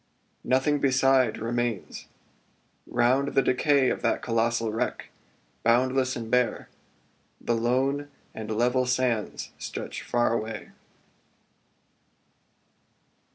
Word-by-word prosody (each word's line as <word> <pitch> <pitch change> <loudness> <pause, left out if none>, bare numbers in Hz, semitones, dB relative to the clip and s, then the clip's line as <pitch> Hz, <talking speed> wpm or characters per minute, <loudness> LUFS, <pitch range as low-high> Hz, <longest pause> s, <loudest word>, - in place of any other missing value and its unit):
Nothing 135 +3 +2
beside 135 -3 +3
remains. 120 -2 -3 0.8
Round 130 +4 +1
the 135 - +4
decay 135 0 +3
Of - - -3
that - - 0
colossal 115 -1 0
wreck, 110 - -3 0.5
boundless 130 +2 +2
and 115 -2 -6
bare 125 -1 +1 0.7
The 120 - -1
lone 135 +5 0 0.2
and 110 -1 -7
level 125 +3 +1
sands 125 -3 -1
stretch - - -6
far 120 -1 +1
away. 110 -1 -4
125 Hz, 95 wpm, -26 LUFS, 115-130 Hz, 0.8 s, the